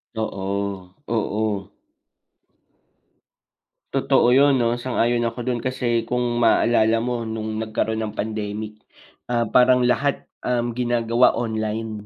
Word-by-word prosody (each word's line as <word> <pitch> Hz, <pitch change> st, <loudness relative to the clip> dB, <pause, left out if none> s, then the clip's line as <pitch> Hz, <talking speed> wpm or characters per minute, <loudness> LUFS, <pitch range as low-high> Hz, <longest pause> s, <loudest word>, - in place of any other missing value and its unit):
Oo, 100 Hz, -3 st, -4 dB
oo. 110 Hz, -3 st, -2 dB, 2.2 s
Totoo -, -, +3 dB
'yon 140 Hz, +3 st, +5 dB
'no. 120 Hz, 0 st, +1 dB
Sang-ayon 120 Hz, -1 st, 0 dB
ako 115 Hz, +1 st, -3 dB
do'n. 120 Hz, -2 st, -1 dB
Kasi 120 Hz, -3 st, 0 dB
kung 125 Hz, +2 st, -1 dB, 0.2 s
maaalala 115 Hz, -1 st, +3 dB
mo 120 Hz, -1 st, -2 dB
nung 110 Hz, -1 st, -4 dB
nagkaroon 110 Hz, 0 st, -2 dB
ng 105 Hz, -, -6 dB
pandemic, 105 Hz, 0 st, -4 dB, 0.5 s
ah, 120 Hz, -2 st, -1 dB
parang 125 Hz, +2 st, +5 dB
lahat, 135 Hz, +3 st, 0 dB, 0.2 s
uhm, 120 Hz, -1 st, -1 dB
ginagawa 120 Hz, 0 st, +2 dB
online, 110 Hz, -2 st, -3 dB
115 Hz, 110 wpm, -22 LUFS, 110-120 Hz, 2.2 s, yon